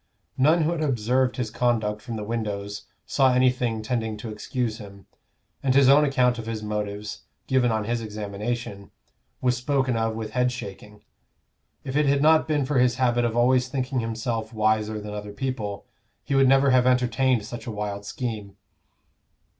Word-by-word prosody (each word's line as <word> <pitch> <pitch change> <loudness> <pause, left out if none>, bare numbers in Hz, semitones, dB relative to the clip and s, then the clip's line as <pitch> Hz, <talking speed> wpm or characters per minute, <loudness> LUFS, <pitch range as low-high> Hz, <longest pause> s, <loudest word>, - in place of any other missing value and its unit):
None 155 +5 +4
who 155 - +1
had 170 -2 -2
observed 125 -2 +1
his 120 -4 -2
conduct 110 -4 0
from 115 0 -6
the 105 - -4
windows 105 -2 -4 0.2
saw 135 -2 +3
anything 125 -3 +1
tending 110 -2 -2
to 110 +1 -7
excuse 110 +1 -3
him, 100 -2 -12 0.6
and 130 -1 +1
his 135 -1 +6
own 145 +2 +7
account 125 -4 +2
of 115 - -7
his 110 -1 -4
motives, 105 0 -4 0.2
given 130 -2 +2
on 110 -1 0
his 115 +2 -2
examination, 105 0 -5 0.5
was 125 -1 +2
spoken 130 0 0
of 115 -1 0
with 110 -1 -5
head 125 +1 +1
shaking; 105 -2 -9 0.8
if 135 0 -5
it 150 -1 +3
had 140 +1 +3
not 160 +1 +5
been 150 -3 +1
for 135 -1 +1
his 125 -1 +3
habit 120 -1 +2
of 115 0 -1
always 125 +1 +3
thinking 130 0 -2
himself 115 0 -3
wiser 110 0 +1
than 105 0 -7
other 105 0 -6
people, 105 -4 -4 0.4
he - - -3
would 135 -1 +5
never 135 +1 +5
have 125 -1 +4
entertained 125 -2 +2
such 120 +2 -8
a - - -3
wild 105 -1 -4
scheme. 105 -2 -5
120 Hz, 175 wpm, -25 LUFS, 105-130 Hz, 0.8 s, own